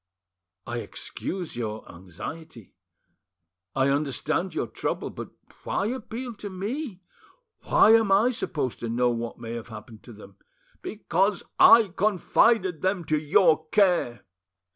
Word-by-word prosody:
"I 120 0 -4
excuse 180 +8 -6
your 110 -2 -5
anxiety, 95 - -10 1.0
I 135 +1 +2
understand 150 +5 -1
your - - -1
trouble, - - -4
but - - -8 0.3
why - - -1
appeal 245 0 -6
to 205 - -7
me? 200 - -5 0.6
Why - - +5
am 225 -3 +4
I 215 +6 +4
supposed 150 - -3
to 115 - -4
know 120 +1 +1
what 115 0 -4
may 115 -1 -7
have 115 -1 -6
happened 110 0 -11
to 120 - -11
them?" 100 -2 -15 0.4
"Because 200 -1 -1 0.2
I 230 -3 +8
confided 195 -2 +2
them 185 -2 -1
to 155 0 +1
your 155 +1 +3
care." 175 - +2
160 Hz, 130 wpm, -26 LUFS, -, 1.0 s, I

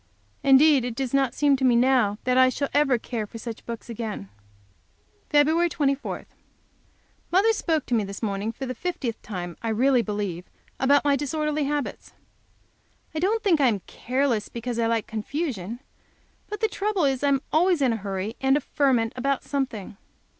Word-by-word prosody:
Indeed 275 0 +6
it 245 -2 -4
does 265 0 -3
not 270 -3 +2
seem 285 -2 +3
to 265 - -4
me 250 -2 +5
now 240 -4 +3
that 250 0 +1
I 255 0 +6
shall 280 +2 -2
ever 285 -4 +3
care 225 -2 -4
for 230 - -9
such 225 0 -8
books 230 -1 -6
again. 220 - -5 1.0
Feb. 315 +4 +4
24. 280 -3 -1 1.1
Mother 400 +5 +4
spoke 320 -8 0
to - - -4
me 225 -3 +3
this 200 +2 -7
morning 205 +1 -1
for 265 +4 -6
the 255 - -3
fiftieth 255 -5 -4
time, 175 -4 -6
I 230 - -2
really 250 +3 +3
believe, 205 -5 -4 0.3
about 280 +2 +4
my 285 -1 +4
disorderly 300 +1 -1
habits. 290 0 -3 1.0
I 315 - -2
don't 430 +6 +1
think 345 -8 +3
I 270 - +5
am 210 -5 0
careless 250 -2 -1
because 235 0 -4
I 230 - +2
like 230 -1 0
confusion, 230 - -4 0.7
but 420 -1 -5
the 440 - +3
trouble 405 -4 0
is 270 -1 0
I - - +3
am 275 -1 +2
always 350 +2 +3
in 260 -4 +2
a - - -2
hurry 200 +1 -4
and 270 +1 +4
a - - -2
ferment 255 -6 +1
about 275 +1 -1
something. 255 -8 -4
260 Hz, 180 wpm, -25 LUFS, 225-290 Hz, 1.1 s, Indeed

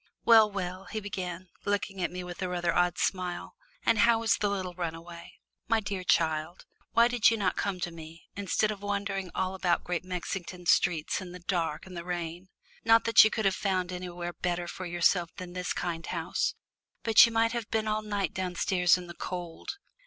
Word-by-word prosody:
"Well, 225 -2 +7
well," 185 -1 -4
he 220 - -4
began, 185 -3 -5
looking 200 -1 -2
at - - +1
me 180 0 -6
with 180 +1 -8
a 185 - -1
rather 175 -1 0
odd 175 0 +2
smile, 180 -2 -2 0.3
"and 225 - +3
how 230 0 +4
is 225 - +4
the 205 0 0
little 185 -3 -3
runaway? 170 -1 -6 0.3
My 225 0 +3
dear 200 -3 -4
child, 160 0 +1 0.3
why 235 0 +6
did 245 -2 +4
you 225 - 0
not 200 - 0
come 195 -2 -2
to 175 - -2
me, 165 0 -11
instead 200 +2 +1
of 205 -2 -7
wandering 200 -2 -2
all 185 0 -1
about 180 -2 +1
Great 175 -1 -2
Mexington 180 0 -5
streets 165 0 +2
in 180 -1 -8
the 180 - -8
dark 170 -4 -2
and 185 -1 -10
the 170 - -5
rain? 175 +1 -5 0.3
Not 225 0 +5
that 230 - +8
you 220 - +4
could 220 -1 -2
have 195 - +4
found 185 -2 -1
anywhere 175 -1 -5
better 175 -1 -2
for 185 +1 -6
yourself 175 0 +2
than 180 -2 -8
this 180 0 -3
kind 170 -2 -3
house, - - -1 0.5
but 225 -1 +8
you - - -4
might 230 0 +2
have 235 -3 -4
been 220 -1 0
all 215 0 0
night 205 -2 -2
downstairs 180 -1 +2
in 180 - -8
the 175 - -9
cold! 175 - -6
185 Hz, 200 wpm, -29 LUFS, 175-205 Hz, 0.5 s, that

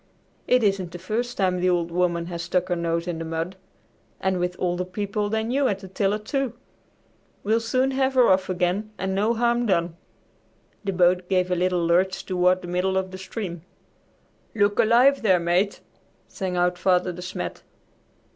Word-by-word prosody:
"It 250 -1 +4
isn't 195 -4 0
the - - -5
first 225 +7 -3
time 185 -2 +1
the 180 +1 +2
'Old 170 -1 0
Woman' 170 -1 0
has 170 -1 -5
stuck 180 +2 -1
her 175 - +1
nose 170 0 -1
in 170 -2 -3
the - - -3
mud, 165 +3 -4 0.6
and 190 -1 0
with 180 0 -1
older 180 0 -1
people 205 +2 -3
than 220 +2 -1
you 275 +1 +2
at 200 - 0
the 195 -1 -11
tiller, 195 +2 0
too! 265 +5 -2 0.9
We'll 220 +3 +2
soon 255 +4 +1
have 265 0 0
her 250 -2 +6
off 190 0 +3
again 185 +3 0
and 190 0 -2
no 210 +4 +1
harm 235 +1 +1
done." 170 -3 +1 0.9
The 200 - -1
boat 180 0 +2
gave 185 -1 +1
a - - +3
little 180 -1 +1
lurch 185 +3 +1
toward 180 0 +2
the - - -6
middle 180 +2 0
of 190 0 -2
the 185 - -8
stream. 185 -3 -6 0.9
"Look 205 -1 +2
alive 250 +5 +5
there, 190 -5 +4
Mate!" 175 +4 0 0.5
sang 185 -2 -4
out 175 0 +1
Father 180 0 +2
De 180 - -8
Smet. 180 +1 -5
185 Hz, 185 wpm, -24 LUFS, 180-210 Hz, 0.9 s, her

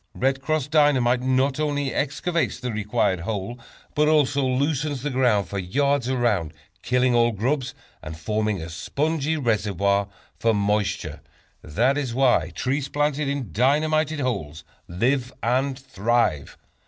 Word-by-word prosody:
"Red 135 +1 0
Cross" 150 -1 -1
Dynamite 135 -5 +3
not 130 +2 +1
only 145 -3 -1
excavates 160 +4 -1
the 125 -2 -3
required 105 -3 0
hole, 105 +5 -4 0.3
but 150 0 +2
also 145 -2 +3
loosens 140 +1 -1
the 145 - -2
ground 120 -7 +2
for 100 - -4
yards 140 +7 0
around, 110 - 0 0.3
killing 125 0 +2
all 120 0 +4
grubs, 130 +5 -2 0.3
and 80 +1 -8
forming 105 +4 -1
a 80 +1 -6
spongy 155 - -1
reservoir 100 - +1 0.3
for 115 -1 +2
moisture. 105 0 -1 0.4
That 125 - +1
is 130 -5 -3
why 125 -11 +3
trees 135 - -1
planted 145 0 0
in 140 - -3
dynamited 155 - +1
holes 80 - -3 0.2
live 125 +8 0
and 130 +3 +1
thrive. 115 - -1
125 Hz, 135 wpm, -24 LUFS, 105-140 Hz, 0.4 s, all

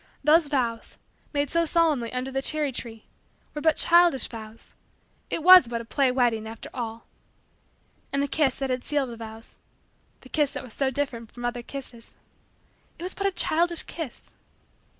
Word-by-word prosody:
Those 310 +2 +5
vows, 240 -5 -2 0.3
made 285 -2 -1
so 335 0 +3
solemnly 310 -8 +1
under 255 +1 -3
the 270 0 -1
cherry 300 0 -1
tree, 225 -3 -8 0.5
were 295 - -5
but 320 -1 +3
childish 340 -6 +4
vows. 220 -1 -10 0.6
It 325 - -2
was 365 -6 +9
but 235 0 -3
a 230 - -8
play 265 +2 +2
wedding, 240 -4 +1
after 225 0 -8
all. 230 -2 -5 1.1
And 280 0 +1
the - - 0
kiss 275 -2 +1
that 270 -1 -3
had 250 0 -2
sealed 285 -4 -1
the - - -7
vows 225 0 -10 0.6
the 260 - -15
kiss 295 -1 +1
that - - -5
was 245 -4 -10
so 270 -1 0
different 255 -5 -4
from 240 -1 -7
other 240 0 -2
kisses 240 -2 -9 0.8
it - - -9
was 370 - -3
but 395 - -1
a - - +1
childish 340 -1 +1
kiss 320 -7 -8
265 Hz, 175 wpm, -26 LUFS, 235-310 Hz, 1.1 s, was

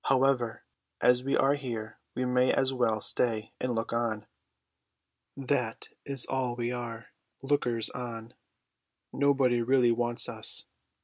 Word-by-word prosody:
However, 130 -3 +1 0.4
as 125 0 +4
we 135 - +1
are 135 +1 +3
here 120 -6 -5 0.2
we 130 - -1
may 125 0 +3
as 135 0 +1
well 115 -4 +1
stay 110 -1 0
and 125 -2 -1
look 115 +1 -2
on. 115 -3 -1 1.1
That 125 -4 -2 0.2
is 135 -3 0
all 130 -2 -2
we 120 0 -2
are, 115 -2 -6 0.3
lookers 125 -5 +1
on. 115 -2 -7 0.8
Nobody 135 -4 +2
really 125 0 +3
wants 120 0 +2
us. - - +2
125 Hz, 130 wpm, -29 LUFS, 115-130 Hz, 1.1 s, as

